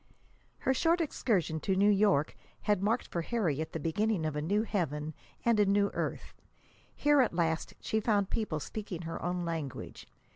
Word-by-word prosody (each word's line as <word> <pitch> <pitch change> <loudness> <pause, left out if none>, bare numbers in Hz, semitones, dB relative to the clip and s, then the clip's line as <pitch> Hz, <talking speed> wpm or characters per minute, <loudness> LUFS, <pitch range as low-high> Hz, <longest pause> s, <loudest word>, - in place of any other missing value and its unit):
Her 265 - +1
short 330 +6 +2
excursion 200 - 0
to 190 +5 0
New 200 +2 +5
York 195 -7 +3 0.3
had 205 -3 +2
marked 220 +5 +1
for 170 - -2
Harriet 160 - -1
the 165 - -4
beginning 185 +3 0
of 155 -1 -2
a 150 - -1
new 200 +8 +1
heaven 155 -8 -2 0.3
and 230 -2 +4
a 205 - +5
new 200 0 +3
earth. - - -3 0.6
Here, 290 -1 +4
at 240 - +1
last, 165 -2 0
she 220 - 0
found 205 -3 +1
people 210 -9 -1
speaking 185 0 -6
her 165 0 -5
own 175 0 -1
language. 160 -5 -5
195 Hz, 175 wpm, -31 LUFS, 160-215 Hz, 0.6 s, New